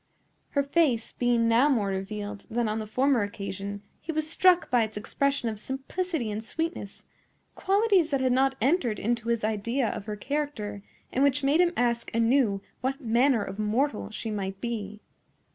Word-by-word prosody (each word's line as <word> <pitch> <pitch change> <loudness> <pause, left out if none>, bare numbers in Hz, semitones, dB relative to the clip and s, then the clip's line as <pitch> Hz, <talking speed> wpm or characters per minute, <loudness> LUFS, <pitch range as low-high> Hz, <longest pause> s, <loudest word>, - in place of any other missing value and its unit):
Her 280 - +4
face 275 -6 +1
being 240 -2 +2
now 235 +6 +4
more 220 -8 +1
revealed 205 +1 -5
than 235 0 0
on 215 +1 -1
the 215 - -5
former 260 +2 +2
occasion, 200 0 -5 0.2
he 325 - -5
was 310 -1 -1
struck 360 +2 +3
by 245 -1 +4
its 220 -1 -2
expression 275 +4 0
of 215 -2 -3
simplicity 270 +1 -3
and 215 +1 -4
sweetness,—qualities 350 - -1
that 275 -3 +1
had 260 -1 +2
not 265 +1 +3
entered 250 - +2
into 230 +1 -1
his 235 -2 0
idea 220 +4 0
of - - -5
her 210 - -3
character, 215 -5 -3 0.3
and 265 - +2
which 280 0 +2
made 290 +5 +4
him 350 -1 +3
ask 235 -1 0
anew 230 -3 +3 0.2
what 270 +3 -2
manner 240 0 +3
of 195 +2 -7
mortal 220 +4 0
she 220 +1 -5
might 195 -2 -4
be. 210 -3 -4
235 Hz, 170 wpm, -27 LUFS, 210-280 Hz, 0.3 s, Her